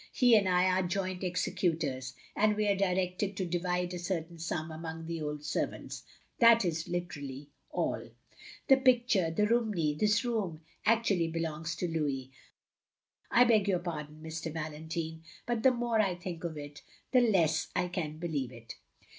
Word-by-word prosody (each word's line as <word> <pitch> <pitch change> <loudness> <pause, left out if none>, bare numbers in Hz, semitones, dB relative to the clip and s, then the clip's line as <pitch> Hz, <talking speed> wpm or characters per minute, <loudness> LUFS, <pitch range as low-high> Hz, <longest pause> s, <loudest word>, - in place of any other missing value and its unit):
He 245 -3 +6
and 200 -3 +4
I 180 0 +4
are 185 0 +3
joint 185 0 -2
executors, 155 -7 -1 0.2
and 210 0 +3
we 210 0 +1
are 200 - +3
directed 190 +1 0
to 185 - -1
divide 180 +1 -1
a 180 - -4
certain 170 -2 -3
stam 160 -1 -3
among 160 0 -6
the 165 -1 -4
old 150 0 -4
servants. - - -3 0.4
That 230 -2 +7
is 165 -2 -1
UteraUy 145 -6 -5 0.2
all." - - -2 0.6
"The 270 - +7
picture 240 -9 +3
— - - -13
^the 210 - +4
Romney 210 -10 +1
— - - -12
^this 210 +2 +3
room 205 -10 -2
— - - -11
^act 230 +1 +4
ually 165 -2 0
belongs 165 0 -3
to 175 +2 -2
Louis. 140 -5 -2 1.0
I 245 - +6
beg 220 -4 +4
your 190 -2 +3
pardon, 155 -3 -6
Mr. 160 0 -4
Valentine, 160 +1 -4 0.2
but 240 -2 -1
the 260 - +7
more 240 -2 0
I 190 -4 +1
think 175 -1 -6
of 160 -2 -4
it, 145 0 -8 0.3
the 255 - +6
less 170 -9 +3
I 180 - +1
can 160 -4 -4
believe 150 -7 -2
it." 115 -2 -10
175 Hz, 175 wpm, -31 LUFS, 160-200 Hz, 1.0 s, That